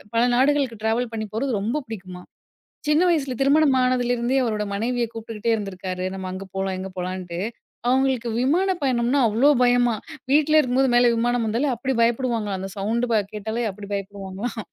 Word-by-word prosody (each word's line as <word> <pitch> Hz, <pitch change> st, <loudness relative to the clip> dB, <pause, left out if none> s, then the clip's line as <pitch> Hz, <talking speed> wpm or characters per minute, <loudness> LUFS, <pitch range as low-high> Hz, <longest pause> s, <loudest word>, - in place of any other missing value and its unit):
பல 230 Hz, -, +4 dB
நாடுகளுக்கு 265 Hz, -4 st, +2 dB
ட்ராவல் 230 Hz, +2 st, 0 dB
பண்ணி 215 Hz, -1 st, -3 dB
போறது 235 Hz, -3 st, 0 dB
ரொம்ப 245 Hz, +8 st, -1 dB
புடிக்குமா. 185 Hz, -4 st, -8 dB, 0.7 s
சின்ன 300 Hz, +3 st, +4 dB
வயசுல 280 Hz, -6 st, 0 dB
திருமணம் 280 Hz, 0 st, +4 dB
ஆனதிலிருந்தே 245 Hz, 0 st, +1 dB
அவரோட 215 Hz, -3 st, -1 dB
மனைவிய 240 Hz, +4 st, 0 dB
கூப்ட்டுக்ட்டே 225 Hz, 0 st, -3 dB
இருந்திருக்காரு. 185 Hz, -3 st, -4 dB
நம்ம 190 Hz, -1 st, -5 dB
அங்க 185 Hz, +1 st, -6 dB
போலாம், 190 Hz, -1 st, -1 dB
இங்க 190 Hz, -, -5 dB
போலான்ட்டு. 180 Hz, -1 st, -4 dB, 0.5 s
அவங்களுக்கு 260 Hz, -2 st, +2 dB
விமான 345 Hz, +9 st, +2 dB
பயணம்னா 250 Hz, 0 st, +1 dB
அவ்ளோ 230 Hz, +7 st, +3 dB
பயமா. 245 Hz, -1 st, +3 dB, 0.4 s
வீட்ல 305 Hz, +2 st, +4 dB
இருக்கும்போது 260 Hz, -1 st, +2 dB
மேல 240 Hz, 0 st, +6 dB
விமானம் 240 Hz, +1 st, +1 dB
வந்தாலே 235 Hz, +7 st, 0 dB
அப்டி 260 Hz, +3 st, -2 dB
பயப்டுவாங்களாம் 230 Hz, -4 st, 0 dB
அந்த 190 Hz, +1 st, -5 dB
சவுண்டு 230 Hz, +5 st, 0 dB, 0.2 s
கேட்டாலே 220 Hz, +3 st, -3 dB
அப்டி 200 Hz, +1 st, -10 dB
பயப்டுவாங்களாம். 200 Hz, +3 st, -5 dB
235 Hz, 150 wpm, -23 LUFS, 205-255 Hz, 0.7 s, மேல